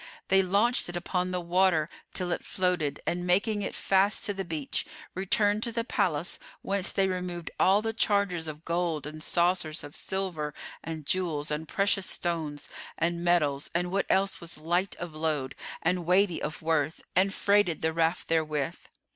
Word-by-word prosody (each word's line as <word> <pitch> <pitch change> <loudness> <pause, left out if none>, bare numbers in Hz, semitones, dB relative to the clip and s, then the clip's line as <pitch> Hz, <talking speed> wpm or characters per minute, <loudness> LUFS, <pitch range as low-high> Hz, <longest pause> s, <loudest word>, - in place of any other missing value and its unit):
They 195 0 +6
launched 200 +5 +2
it 175 - -6
upon 180 +1 -1
the 180 0 -1
water 175 -2 +3 0.2
till 180 -2 -1
it - - -1
floated 180 -6 0
and, 175 +1 -1
making 205 +4 +2
it 195 - -3
fast 195 +2 +2
to 205 - 0
the 195 0 -3
beach, 160 -5 -1 0.3
returned 205 +2 +2
to 235 - -1
the 230 0 -1
palace, 180 - -1 0.2
whence 195 -1 0
they 195 -1 +2
removed 180 -2 -3
all 200 +3 +5
the 225 0 -1
chargers 200 -7 +1
of 155 +1 -7
gold 170 -3 0
and 155 +1 -7
saucers 170 -2 +1
of 145 0 -9
silver 175 -7 -3 0.3
and 160 -2 -5
jewels 155 -4 0
and 155 +1 -2
precious 195 +1 +1
stones 160 -4 -2 0.3
and 170 +1 0
metals 150 -5 +2
and 180 +1 0
what 195 +1 0
else 195 0 +2
was 170 -2 -6
light 175 +5 0
of 175 -3 -7
load 155 -4 -1 0.3
and 180 0 0
weighty 185 -1 +3
of 155 +1 -4
worth 160 -1 0
and 190 +2 +4
freighted 200 -5 +2
the 160 0 +1
raft 165 +1 +1
therewith. 155 -4 0
175 Hz, 170 wpm, -28 LUFS, 160-195 Hz, 0.3 s, They